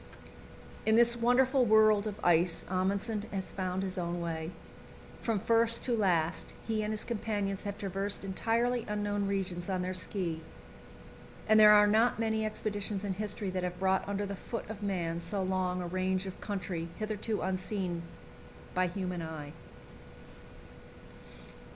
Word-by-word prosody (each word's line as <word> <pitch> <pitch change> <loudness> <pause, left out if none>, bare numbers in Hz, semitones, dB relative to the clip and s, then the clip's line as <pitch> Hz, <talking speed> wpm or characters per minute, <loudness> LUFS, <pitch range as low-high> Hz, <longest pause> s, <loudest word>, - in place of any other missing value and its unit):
In 220 - +3
this 235 0 +6
wonderful 250 +3 +3
world 215 -2 +5
of 210 -1 -5
ice 175 0 +3
Amundsen 200 +4 0
has 190 -2 -3
found 185 0 -2
his 185 -1 -3
own 175 0 -2
way. 165 -1 -3 0.7
From 225 -3 0
first 230 +2 +2
to 245 - +1
last 175 -6 +1
he 220 -1 0
and 210 0 -2
his 215 - -1
companions 205 -4 -2
have 200 0 -3
traversed 195 0 -2
entirely 230 +5 +1
unknown 205 -1 -1
regions 190 -2 -2
on 185 -1 0
their 185 +1 -2
ski, 180 -3 -2 1.1
and 215 0 +6
there 210 -1 +9
are 210 0 +7
not 220 +3 +3
many 220 -1 0
expeditions 210 -2 -2
in 195 - -1
history 205 0 -3
that 185 0 -2
have 180 0 -3
brought 190 +1 +1
under 200 0 -1
the 200 0 -4
foot 230 +4 -6
of 215 -1 -8
man 175 -5 -1
so 195 +3 -2
long 185 -1 0
a - - -4
range 185 +1 0
of 190 - -7
country 180 -4 -3
hitherto 215 0 -2
unseen 185 -2 -2 0.7
by 185 0 +2
human 180 -1 -3
eye. 155 -2 -6
195 Hz, 150 wpm, -31 LUFS, 185-215 Hz, 1.1 s, there